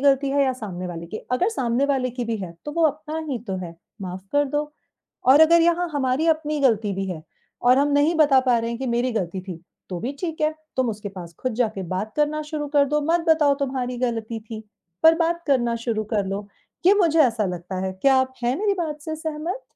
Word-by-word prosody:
गलती 275 0 +3
है 280 +1 +3
या 260 - +1
सामने 190 -7 -6
वाले 170 -1 -6
की। 215 - -6 0.2
अगर 350 +10 +2
सामने 255 - 0
वाले 265 -3 0
की 245 0 -4
भी 230 -1 -2
है 185 -5 -6
तो 295 - -5
वो 335 +2 0
अपना 305 +1 -3
ही 250 - -1
तो 190 - -1
है, 170 -1 -8 0.3
माफ 185 0 -6
कर 290 0 +3
दो 295 +2 -2 0.6
और 270 +4 +7
अगर 335 +2 +7
यहाँ 345 +1 +2
हमारी 275 +2 0
अपनी 305 -1 +1
गलती 220 -6 +2
भी 195 0 -2
है 160 -3 -6 0.4
और 250 +2 +5
हम 285 - +3
नहीं 290 +4 +3
बता 290 -4 +5
पा 250 -2 +2
रहे 230 0 -2
हैं 235 - -4
कि 265 - -3
मेरी 240 +1 0
गलती 190 -4 -2
थी, 180 -3 -8 0.3
तो 180 - -4
भी 250 +5 -3
ठीक 325 -3 -4
है। 305 0 +1 0.2
तुम 260 -2 +1
उसके 210 -1 -6
पास 175 -4 -10
खुद 255 -3 -2
जाके 220 -4 -1
बात 195 +4 -3
करना 300 +1 +1
शुरू 300 -1 -4
कर 285 -1 +4
दो, 300 +1 +1
मत 330 +4 +1
बताओ 305 -3 +5
तुम्हारी 255 -2 -2
गलती 230 -2 -2
थी, 220 0 -8 0.4
पर 320 0 +8
बात 340 0 0
करना 240 -5 +2
शुरू 215 -2 0
कर 205 -2 +1
लो, 200 +1 -4 0.4
कि 375 - +7
मुझे 335 -5 +3
ऐसा 225 -5 +1
लगता 180 +1 -5
है। 190 - -2
क्या 265 +9 +3
आप 260 0 0
हैं 245 +2 +1
मेरी 410 0 +1
बात 315 -5 -3
से 315 0 -4
सहमत? 320 +8 -4
260 Hz, 235 wpm, -23 LUFS, 220-300 Hz, 0.6 s, पर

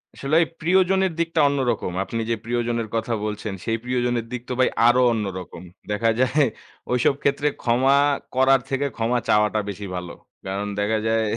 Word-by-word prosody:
আসলে 140 +3 -1
এই - - -4
প্রিয়জনের 190 +2 +2
দিকটা 165 -1 0
অন্যরকম। 130 -9 -1
আপনি 115 +4 -4
যে, 115 - +2
প্রিয়জনের 120 -1 -1
কথা 115 +1 -1
বলছেন 105 -1 -4
সেই 115 -1 0
প্রিয়জনের 125 -2 -1
দিক 125 -1 -4
তো - - -1
ভাই 130 - +4 0.2
আরো 125 +1 +5
অন্য 110 -2 -1
রকম। 90 -1 -10 0.3
দেখা 115 +2 +1
যায় 130 +4 +3 0.5
ঐসব 125 +2 +2
ক্ষেত্রে 140 +1 +1
ক্ষমা 130 +3 +3 0.4
করার 130 +1 +5
থেকে 135 +1 0
ক্ষমা 120 +2 0
চাওয়াটা 105 0 +3
বেশি 100 0 -6
ভালো। 90 -1 -5 0.3
কারণ 100 +2 -3
দেখা 105 +2 +1
যায় 110 0 +2
120 Hz, 170 wpm, -23 LUFS, 110-135 Hz, 0.5 s, আরো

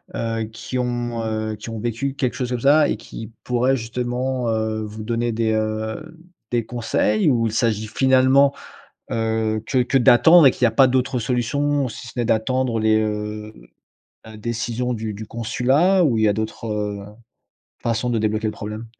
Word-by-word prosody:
heu, 115 -1 -2
qui 125 +3 -5
ont, 120 -1 -2
heu, 110 -1 -2
qui 105 +2 -9
ont 115 -1 -5
vécu 120 +5 -2
quelque 135 -3 -2
chose 125 -2 -3
comme 125 - -2
ça 145 +2 +5
et - - -1
qui 110 0 -9
pourraient 125 +2 +1
justement, 125 +1 -2
heu, 110 0 -1
vous 110 +1 -7
donner 115 +1 -1
des, 110 0 0
heu, 110 +9 -3 0.3
des 120 -2 0
conseils? 110 -1 +1
Ou 115 -4 +2
il 110 - -4
s'agit, 110 -2 0
finalement, 130 +3 +4 0.6
heu, 110 -1 0
que 130 - 0
que 125 +2 +1
d'attendre 155 +7 +7
et - - +8
qu'il 125 - -1
y - - +7
a - - -2
pas 130 +4 +5
d'autres 130 0 0
solutions 130 +5 0
si 120 +1 -9
ce - - -10
n'est 120 - +1
d'attendre 120 +2 0
les 110 0 +3
heu, 105 0 -4 0.7
la 110 0 -11
décisions 120 +2 -2
du 110 -1 -4
du 110 +2 -7
consulat 135 - +2
ou 125 -8 +2
il 110 - +1
y - - +5
a 105 - +3
d'autres 105 -1 -4 0.7
façons 115 +1 -1
de 115 - +1
débloquer 110 0 -1
le 110 - -1
problème? 105 +2 -7
115 Hz, 185 wpm, -21 LUFS, 110-125 Hz, 0.7 s, et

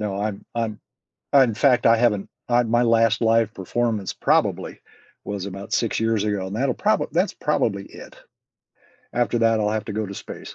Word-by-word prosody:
No, 100 -1 -3
I'm 105 -1 -3
I'm 110 -2 -2 0.5
in 130 -6 +5
fact, 125 +1 +3
I 115 - +5
haven't 110 -4 +1 0.2
uh, 120 0 +3
my 120 +2 +2
last 115 -1 +3
live 115 -1 +3
performance 110 +1 -2
probably - - 0 0.4
was 100 -1 -5
about 100 +1 -7
6 115 - 0
years 115 -2 +1
ago, 100 -3 -1
and 95 - -6
that'll 130 +2 0
proba - - +1
that's - - +1
probably 100 0 -1
it. - - -13 1.0
After 120 0 0
that, 115 -1 +3
I'll 105 -1 +1
have 110 -1 -2
to 105 - -4
go 110 0 -2
to 100 - -8
space. - - -9
110 Hz, 180 wpm, -23 LUFS, 100-115 Hz, 1.0 s, in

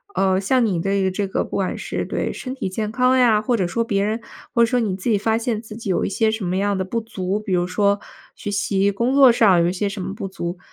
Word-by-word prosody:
呃， 190 0 +2
像 250 +4 +2
你 180 -6 0
对 195 0 +1
这 200 +2 -2
个 - - -1
不 - - -16
管 190 -2 -1
是 - - -4
对 - - -2
身 255 0 -6
体 225 - -3
健 210 +3 -3
康 255 +1 +3
呀， 225 -4 +4
或 240 +2 +1
者 185 - +1
说 230 +6 -1
别 200 -4 0
人， 220 +3 -1 0.3
或 235 - +3
者 - - +6
说 250 +1 +1
你 200 -4 -1
自 195 +5 -3
己 210 - +3
发 220 +2 +1
现 230 -2 -2
自 220 -2 -10
己 220 -4 -6
有 185 - +1
一 - - -1
些 220 +3 +1
什 220 -4 -3
么 180 +2 -1
样 200 0 0
的 190 - -1
不 230 +5 -2
足， 200 -2 -3
比 205 -3 -4
如 175 0 +2
说 200 +2 +1 0.3
学 205 - -5
习、 200 0 +1
工 235 +7 0
作 270 -3 +8
上 200 -7 +4
有 170 - +2
一 180 - -2
些 200 +2 -1
什 195 -1 -6
么 190 +2 -4
不 200 -3 -5
足， 175 -1 -5
205 Hz, 300 characters per minute, -21 LUFS, 190-230 Hz, 0.3 s, 作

